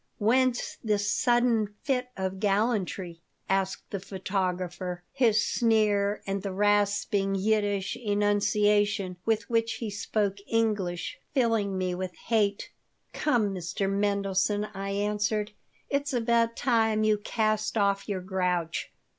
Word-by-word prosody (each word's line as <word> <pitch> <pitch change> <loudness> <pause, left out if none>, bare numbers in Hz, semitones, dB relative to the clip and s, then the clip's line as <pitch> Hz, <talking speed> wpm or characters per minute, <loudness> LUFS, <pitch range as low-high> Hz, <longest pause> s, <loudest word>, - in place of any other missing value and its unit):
Whence 245 +3 +1
this 205 -2 +1
sudden 240 -4 +2
fit 250 -3 0
of 190 0 -3
gallantry?" 195 -4 0 0.3
asked 195 0 -1
the 200 - -2
photographer, 185 -2 -3
his 225 -5 +3
sneer 210 -3 +2
and 195 0 -2
the 195 - -4
rasping 200 0 +1
Yiddish 205 -1 0
enunciation 205 -2 +1
with 220 -1 +1
which 230 -1 +1
he 225 -3 -5
spoke 205 -1 -1
English 205 -6 -1 0.2
filling 225 -6 +1
me 185 -1 -1
with 180 0 -4
hate 210 -3 0 0.4
"Come, 230 -9 +1
Mr. 185 +2 -2
Mendelson," 200 +1 0
I 195 0 -4
answered, 210 +1 -1 0.4
"it's 285 0 -1
about 230 -1 +2
time 225 -3 +2
you 215 -1 +3
cast 215 0 0
off 200 0 +1
your 190 -2 -2
grouch. 180 -3 -1
205 Hz, 120 wpm, -28 LUFS, 195-220 Hz, 0.4 s, his